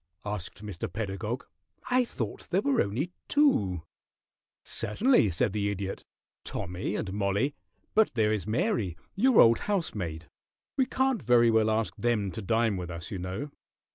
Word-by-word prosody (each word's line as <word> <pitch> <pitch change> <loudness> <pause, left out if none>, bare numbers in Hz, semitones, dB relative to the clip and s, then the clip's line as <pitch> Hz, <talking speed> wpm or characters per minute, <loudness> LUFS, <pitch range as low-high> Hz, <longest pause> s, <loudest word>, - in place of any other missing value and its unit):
asked 105 0 -5
Mr. 100 0 -5
Pedagog. 105 +4 -3 0.5
"I 250 0 +4
thought 115 - -5
there 190 +4 +1
were 275 -3 +3
only 125 - -1 0.2
two 100 - +3 0.4
" - - -66 0.2
"Certainly," 210 - +2
said 90 +3 0
the 100 -1 0
Idiot. 100 -1 -4 0.4
"Tommy 90 +3 -3
and 95 -3 -3
Mollie, 100 +7 +1 0.4
but 220 0 +3
there 110 -2 +3
is 105 -1 -2
Mary, 105 -5 0 0.2
your 245 +4 +4
old 115 0 +7
housemaid. 95 - -2 0.5
We 260 -2 +2
can't 265 -1 +1
very 120 0 +5
well 110 -1 +3
ask 110 0 0
them 110 -5 0
to 110 - -5
dine 110 0 +1
with 90 -1 -5
us, 85 -1 -7
you 95 - -3
know." 95 +11 -4
110 Hz, 155 wpm, -29 LUFS, 95-140 Hz, 0.5 s, old